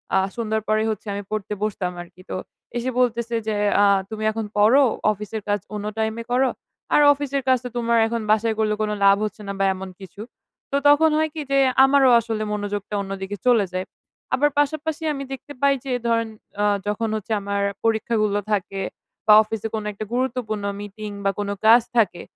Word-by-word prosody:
আ -, -, +5 dB, 0.2 s
সন্ধ্যর 220 Hz, -2 st, -1 dB
পরেই 215 Hz, +1 st, +1 dB
হচ্ছে 215 Hz, 0 st, -7 dB
আমি 200 Hz, 0 st, -4 dB
পড়তে 210 Hz, -1 st, -3 dB
বসতাম 190 Hz, -4 st, -2 dB
আরকি। 175 Hz, +1 st, -14 dB
তো -, -, -3 dB, 0.4 s
এসে 245 Hz, +2 st, -1 dB
বলতেছে 235 Hz, -1 st, 0 dB
যে, 215 Hz, -, 0 dB, 0.3 s
"আ -, -, +6 dB, 0.2 s
তুমি 215 Hz, 0 st, -5 dB
এখন 220 Hz, 0 st, -4 dB
পড়ো, 235 Hz, +7 st, +6 dB, 0.3 s
অফিসের 210 Hz, +1 st, -5 dB
কাজ 205 Hz, 0 st, +1 dB, 0.2 s
অন্য 210 Hz, 0 st, -4 dB
টাইমে 220 Hz, +1 st, -2 dB
করো। 255 Hz, +1 st, +3 dB, 0.4 s
আর 295 Hz, -, +6 dB
অফিসের 280 Hz, -1 st, -3 dB
কাজ 260 Hz, -1 st, +5 dB
তো -, -, -3 dB
তোমার 235 Hz, 0 st, +2 dB
এখন 230 Hz, 0 st, -2 dB
বাসায় 220 Hz, 0 st, +2 dB
করলে 215 Hz, -1 st, +2 dB
কোন 210 Hz, 0 st, 0 dB
লাভ 195 Hz, 0 st, +6 dB
হচ্ছে 210 Hz, 0 st, -6 dB
না 200 Hz, -, -3 dB
বা, 195 Hz, -, +3 dB
এমন 190 Hz, 0 st, -7 dB
কিছু।" 195 Hz, +2 st, -11 dB, 0.5 s
তো -, -, 0 dB
তখন 315 Hz, +2 st, +5 dB
হয় 315 Hz, 0 st, +1 dB
কি? 310 Hz, -, -4 dB
যে 275 Hz, -, +3 dB, 0.3 s
আমারও 270 Hz, -1 st, +5 dB
আসলে 225 Hz, -2 st, -3 dB
মনোযোগটা 205 Hz, 0 st, -4 dB
অন্যদিকে 195 Hz, +1 st, -5 dB
চলে 230 Hz, -5 st, +5 dB
যায়। 185 Hz, 0 st, -2 dB, 0.5 s
আবার 295 Hz, +2 st, +3 dB
পাশাপাশি 310 Hz, +2 st, -1 dB
আমি 275 Hz, 0 st, -5 dB
দেখতে 280 Hz, +2 st, -9 dB
পাই 280 Hz, 0 st, +5 dB
যে 265 Hz, -, -3 dB, 0.2 s
ধরেন 230 Hz, -1 st, +1 dB, 0.3 s
অ 210 Hz, -, +3 dB, 0.2 s
যখন 220 Hz, +2 st, -1 dB
হচ্ছে 215 Hz, +1 st, -6 dB
আমার 200 Hz, 0 st, -2 dB, 0.2 s
পরীক্ষাগুলো 220 Hz, -2 st, +1 dB
থাকে 195 Hz, -1 st, -1 dB, 0.5 s
বা, 210 Hz, -, +8 dB
অফিসে 225 Hz, 0 st, -4 dB
কোনো 215 Hz, -1 st, -4 dB
একটা 215 Hz, +2 st, -6 dB
গুরুত্বপূর্ণ 245 Hz, -5 st, -2 dB, 0.2 s
মিটিং 205 Hz, +1 st, -7 dB, 0.2 s
বা, 195 Hz, -, +3 dB
কোন 205 Hz, -1 st, -2 dB
ক্লাস 225 Hz, +2 st, +6 dB
থাকে, 200 Hz, -6 st, +2 dB
220 Hz, 190 wpm, -22 LUFS, 205-245 Hz, 0.5 s, বা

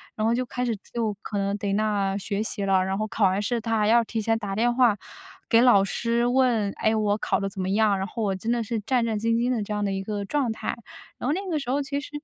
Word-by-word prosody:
然 215 Hz, 0 st, 0 dB
后 230 Hz, -, +3 dB
就 250 Hz, +2 st, 0 dB
开 250 Hz, +1 st, -3 dB
始 235 Hz, -2 st, 0 dB, 0.2 s
就 225 Hz, -3 st, -1 dB
可 210 Hz, -, -5 dB
能 200 Hz, 0 st, 0 dB
逮 200 Hz, -1 st, -2 dB
那 200 Hz, -2 st, 0 dB
学 205 Hz, +1 st, -2 dB
习 205 Hz, -2 st, -3 dB
了， 190 Hz, -1 st, +3 dB
然 190 Hz, +1 st, -2 dB
后 215 Hz, +1 st, -1 dB
考 210 Hz, 0 st, +1 dB
完 190 Hz, +2 st, +2 dB
试， 235 Hz, +3 st, -1 dB
她 225 Hz, 0 st, 0 dB
还 210 Hz, -, +2 dB
要 235 Hz, +2 st, +5 dB
提 225 Hz, 0 st, -3 dB
前 225 Hz, +1 st, +1 dB
打 200 Hz, -3 st, -4 dB
电 240 Hz, +2 st, +2 dB
话 240 Hz, -4 st, +4 dB, 0.5 s
给 230 Hz, -, +6 dB
老 240 Hz, -6 st, +6 dB
师 235 Hz, +4 st, 0 dB
问， 245 Hz, -5 st, +2 dB
诶， 220 Hz, 0 st, +3 dB
我 210 Hz, -1 st, +1 dB
考 -, -, 0 dB
的 195 Hz, -, -2 dB
怎 190 Hz, -, -6 dB
么 185 Hz, -, -2 dB
样， 205 Hz, 0 st, +3 dB
然 190 Hz, -, -2 dB
后 225 Hz, +1 st, -4 dB
我 195 Hz, -2 st, 0 dB
真 220 Hz, +5 st, -5 dB
的 240 Hz, -1 st, 0 dB
是 225 Hz, +1 st, -2 dB
战 230 Hz, +3 st, 0 dB
战 220 Hz, -2 st, -1 dB
兢 225 Hz, -, -3 dB
兢 235 Hz, +2 st, +1 dB
的 240 Hz, -3 st, 0 dB
这 205 Hz, -, -6 dB
样 210 Hz, 0 st, -1 dB
的 195 Hz, -, -1 dB
一 195 Hz, -, -2 dB
个 205 Hz, 0 st, -3 dB
状 260 Hz, +2 st, 0 dB
态， -, -, -4 dB, 0.4 s
然 245 Hz, -, -3 dB
后 -, -, +2 dB
那 390 Hz, +4 st, -3 dB
个 310 Hz, -, 0 dB
时 275 Hz, -3 st, -6 dB
候 280 Hz, +2 st, +1 dB
其 280 Hz, 0 st, -3 dB
实 285 Hz, -, -9 dB
220 Hz, 310 characters per minute, -25 LUFS, 200-240 Hz, 0.5 s, 给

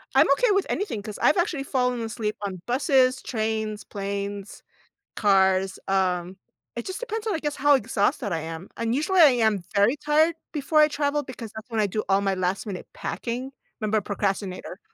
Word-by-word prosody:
I'm -, -, +6 dB
okay -, -, +2 dB
with 395 Hz, -1 st, +2 dB
anything 380 Hz, -, -2 dB
'cause 210 Hz, 0 st, -8 dB
I've -, -, +4 dB
actually 345 Hz, -6 st, 0 dB
fallen 250 Hz, -3 st, 0 dB
asleep 220 Hz, -1 st, -3 dB
on 190 Hz, -3 st, -4 dB
buses, 255 Hz, 0 st, +3 dB
trains, 220 Hz, -2 st, -2 dB
planes, 200 Hz, 0 st, -5 dB, 0.5 s
cars. 190 Hz, -2 st, +3 dB
Um, 185 Hz, -1 st, 0 dB, 0.4 s
it 235 Hz, -, -5 dB
just 375 Hz, +3 st, -5 dB
depends 450 Hz, -3 st, -4 dB
on, 425 Hz, -, +1 dB
I 320 Hz, -, -1 dB
guess, 295 Hz, -1 st, -2 dB
how 290 Hz, +2 st, +4 dB
exhausted 225 Hz, -1 st, 0 dB
I 165 Hz, -, 0 dB
am. 165 Hz, +3 st, -7 dB
And 230 Hz, 0 st, -1 dB
usually 310 Hz, +8 st, +1 dB
I 315 Hz, -4 st, +9 dB, 0.2 s
am 205 Hz, -4 st, +1 dB
very 205 Hz, +6 st, +4 dB
tired 300 Hz, +3 st, +3 dB, 0.2 s
before 305 Hz, +1 st, +1 dB
I 305 Hz, -, +7 dB
travel 295 Hz, 0 st, -1 dB
because 240 Hz, -4 st, -8 dB
that's 220 Hz, +2 st, -9 dB
when 225 Hz, -2 st, -2 dB
I 210 Hz, -, +3 dB
do 215 Hz, +2 st, -2 dB
all 195 Hz, 0 st, +3 dB
my 195 Hz, -1 st, 0 dB
last 185 Hz, +2 st, -1 dB
minute 190 Hz, -3 st, -6 dB
packing. 250 Hz, +3 st, -4 dB, 0.3 s
'Member 215 Hz, 0 st, +1 dB
procrastinator. 195 Hz, -2 st, -3 dB
220 Hz, 185 wpm, -25 LUFS, 200-285 Hz, 0.5 s, I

